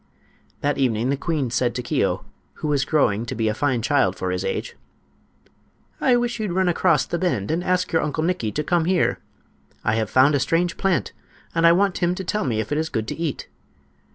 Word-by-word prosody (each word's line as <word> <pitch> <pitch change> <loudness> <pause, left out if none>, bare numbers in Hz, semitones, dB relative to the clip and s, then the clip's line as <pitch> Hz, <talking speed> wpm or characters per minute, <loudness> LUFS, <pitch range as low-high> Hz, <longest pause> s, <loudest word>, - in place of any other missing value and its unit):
That 145 0 0
evening 125 -1 +1
the - - +2
queen 145 -4 -2
said 120 0 0
to 125 - -3
Keo, - - 0 0.3
who - - -5
was 140 -3 +1
growing 115 -9 +2
to - - -4
be 110 -1 0
a 105 - +1
fine 130 -1 0
child 115 -9 +2
for 90 0 -3
his 90 0 -2
age: - - -3 1.3
"I 255 - +4
wish 240 -1 -1
you'd 210 -5 -2
run 190 0 +2
across 165 -4 +2
the 170 - -3
bend 160 - -1
and 170 +2 -1
ask 185 0 0
your 160 - +2
Uncle 155 +1 -2
Nikki 165 -11 -1
to 150 - -1
come 170 +1 +1
here. 180 0 +1 0.6
I 110 - +1
have 110 -3 -1
found 135 +3 +5
a 145 - +2
strange 170 +6 +1
plant, 190 -3 0 0.4
and 170 +1 +5
want 195 -1 +1
him 175 +1 +1
to 190 - -5
tell 210 +2 -1
me 115 -5 0
if 110 - -4
it 150 - +1
is 160 0 -2
good 110 0 -3
to - - -3
eat." 165 -4 -4
150 Hz, 215 wpm, -23 LUFS, 120-175 Hz, 1.3 s, found